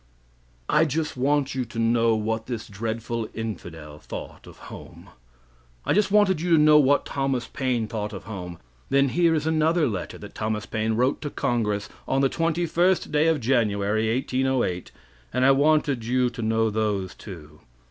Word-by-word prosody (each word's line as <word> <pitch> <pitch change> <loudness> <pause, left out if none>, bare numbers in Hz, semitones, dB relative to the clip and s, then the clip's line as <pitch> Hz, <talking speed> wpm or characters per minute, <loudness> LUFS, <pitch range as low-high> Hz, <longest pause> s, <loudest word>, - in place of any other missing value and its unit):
I 160 - +4
just 155 +1 -2
want 140 +2 +1
you 130 -1 -1
to 115 0 -11
know 115 0 +3
what 110 +1 -2
this 120 -3 -5
dreadful 115 +1 -4
infidel 80 -9 -7
thought - - -9
of - - -13
home. - - -12 0.8
I - - +2
just 210 -1 +2
wanted 200 -5 +3
you 175 - -2
to - - +7
know 150 0 +6
what 145 0 +3
Thomas 135 -3 -1
Paine 125 -6 -1
thought 105 -1 -4
of 95 - -8
home. 90 -5 -7 0.3
Then 140 0 +3
here 170 +2 +3
is 150 -1 -1
another 160 0 +2
letter 95 -6 -4
that - - -11
Thomas 110 -1 -3
Paine 110 0 -1
wrote 125 +4 +1
to 145 - -3
congress 110 -7 -1 0.2
on 135 - +1
the 135 - +3
21st 170 +2 +1
day 150 +1 +3
of 160 -2 +2
January, 110 -3 +1
1808, 130 -7 -1 0.4
and 130 - +1
I 135 - +7
wanted 145 -3 +2
you 125 +1 +1
to - - -7
know 110 0 +1
those 105 -3 -1
two. 75 -6 -11
120 Hz, 170 wpm, -25 LUFS, 110-145 Hz, 0.8 s, to